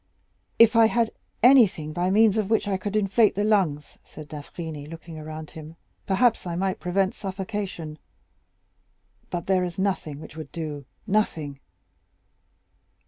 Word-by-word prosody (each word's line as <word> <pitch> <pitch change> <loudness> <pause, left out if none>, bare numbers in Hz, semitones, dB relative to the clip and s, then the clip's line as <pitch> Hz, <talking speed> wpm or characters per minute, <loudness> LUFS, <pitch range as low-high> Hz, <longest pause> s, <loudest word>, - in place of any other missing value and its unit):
"If 230 0 +6
I 225 -1 +7
had 230 0 +1 0.3
anything 210 - +5
by 175 +3 0
means 215 +1 +5
of 210 -2 -1
which 220 -2 +2
I 200 - +1
could 205 +2 -4
inflate 210 +1 +3
the 205 - 0
lungs," 185 -9 0
said 150 -1 -12
d'Avrigny, 150 0 -7
looking 165 0 -9
around 155 0 -8
him, 160 0 -10 0.3
"perhaps 205 +1 +2
I 170 - -3
might 190 +1 -1
prevent 190 +2 0
suffocation. 190 -5 -5 1.3
But 175 -1 -4
there 190 -1 +2
is 175 -2 -4
nothing 185 -7 -2
which 155 - -11
would 160 -1 -8
do!—nothing!" 155 - -3
185 Hz, 140 wpm, -25 LUFS, 155-205 Hz, 1.3 s, I